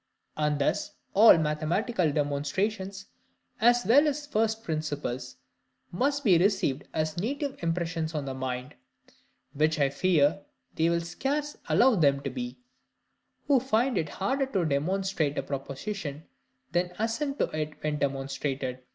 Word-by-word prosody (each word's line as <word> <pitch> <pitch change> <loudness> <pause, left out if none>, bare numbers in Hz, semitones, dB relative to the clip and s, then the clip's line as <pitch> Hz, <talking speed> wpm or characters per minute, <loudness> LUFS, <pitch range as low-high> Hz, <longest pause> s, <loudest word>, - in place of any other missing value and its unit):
And 150 -1 +1
thus 140 - 0 0.2
all 215 -2 +8
mathematical 160 +5 0
demonstrations, 190 +8 -2 0.5
as 240 0 +4
well 280 +9 +6
as 295 0 -2
first 225 -5 0
principles, 145 - -3 0.6
must 280 +9 0
be 185 -8 +5
received 170 -7 +1
as 155 0 -2
native 275 - -3
impressions 165 -1 -2
on 145 -2 -2
the 135 - -4
mind; 130 +1 -4 0.8
which 155 +2 +2
I 140 -1 +3
fear 160 +3 +2 0.3
they 165 +1 +2
will 170 0 +1
scarce 285 - -2
allow 255 +2 +5
them 140 -8 +3
to 140 - -4
be, 245 -1 -5 0.9
who 280 -3 +4
find 250 0 +1
it 160 -5 -1
harder 265 - -1
to 190 -10 0
demonstrate 160 +1 0
a - - 0
proposition 145 +3 -5 0.5
than 175 +1 0
assent 275 +6 -1
to - - 0
it 155 0 -2
when 150 -1 -1
demonstrated. 135 -1 -2
170 Hz, 135 wpm, -28 LUFS, 145-225 Hz, 0.9 s, all